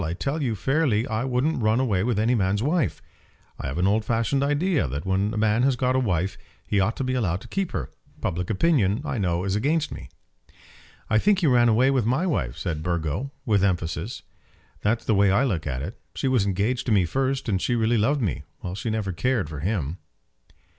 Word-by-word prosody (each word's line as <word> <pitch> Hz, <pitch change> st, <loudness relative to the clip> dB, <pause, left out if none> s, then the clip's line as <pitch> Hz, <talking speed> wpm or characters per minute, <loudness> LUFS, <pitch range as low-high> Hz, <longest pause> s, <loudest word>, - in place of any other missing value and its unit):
I 80 Hz, 0 st, -2 dB
tell 140 Hz, -, -2 dB
you 120 Hz, -5 st, 0 dB
fairly 130 Hz, -1 st, +1 dB
I 110 Hz, +1 st, -1 dB
wouldn't 130 Hz, +3 st, 0 dB
run 110 Hz, +2 st, +2 dB
away 110 Hz, -8 st, +1 dB
with 120 Hz, -2 st, 0 dB
any 110 Hz, +4 st, +2 dB
man's 100 Hz, -1 st, +1 dB
wife. 145 Hz, -, 0 dB, 0.6 s
I -, -, -4 dB
have 70 Hz, +4 st, -4 dB
an 90 Hz, -, +2 dB
old 105 Hz, +3 st, +2 dB
fashioned 115 Hz, +5 st, 0 dB
idea 145 Hz, -, +1 dB
that 70 Hz, +4 st, -4 dB
when 95 Hz, +2 st, +1 dB
a 110 Hz, -, -4 dB
man 110 Hz, +2 st, +2 dB
has 135 Hz, 0 st, +3 dB
got 125 Hz, +1 st, +1 dB
a -, -, +3 dB
wife 95 Hz, -5 st, -1 dB, 0.3 s
he 100 Hz, -, +1 dB
ought 100 Hz, +4 st, +1 dB
to -, -, -2 dB
be 130 Hz, 0 st, -1 dB
allowed 95 Hz, -9 st, 0 dB
to -, -, -12 dB
keep 195 Hz, -2 st, -2 dB
her. -, -, -4 dB, 0.3 s
Public 90 Hz, +1 st, -2 dB
opinion, 110 Hz, -, +2 dB
I 120 Hz, -, -2 dB
know, 90 Hz, -2 st, 0 dB
is 95 Hz, 0 st, -1 dB
against 150 Hz, +8 st, 0 dB
me." -, -, -8 dB, 1.0 s
"I 110 Hz, -, +3 dB
think 200 Hz, -, +3 dB
he -, -, +2 dB
ran 120 Hz, -4 st, +5 dB
away 125 Hz, +5 st, +4 dB
with 130 Hz, -5 st, +1 dB
my 130 Hz, +9 st, +1 dB
wife," 70 Hz, -, -1 dB
said 80 Hz, -2 st, -3 dB
Burgo, 85 Hz, -, -2 dB
with 105 Hz, -6 st, +2 dB
emphasis; 90 Hz, +2 st, -1 dB, 0.6 s
"that's 110 Hz, +3 st, 0 dB
the 110 Hz, -, +2 dB
way 100 Hz, 0 st, +4 dB
I 100 Hz, +8 st, +3 dB
look 90 Hz, -, -1 dB
at 65 Hz, -1 st, -3 dB
it. 95 Hz, +8 st, -7 dB
She 135 Hz, -, -1 dB
was 125 Hz, -7 st, +2 dB
engaged 105 Hz, +7 st, -1 dB
to -, -, +1 dB
me 100 Hz, -4 st, +4 dB
first; 135 Hz, +8 st, -1 dB
and 95 Hz, -4 st, 0 dB
she 120 Hz, -, +1 dB
really 115 Hz, 0 st, +2 dB
loved 135 Hz, +5 st, +1 dB
me, 90 Hz, -, -1 dB, 0.2 s
while 90 Hz, -, -5 dB
she 100 Hz, +4 st, -4 dB
never 110 Hz, -3 st, -1 dB
cared 115 Hz, -, 0 dB
for 75 Hz, -, -6 dB
him." 85 Hz, -2 st, -2 dB
110 Hz, 220 wpm, -25 LUFS, 95-130 Hz, 1.0 s, ran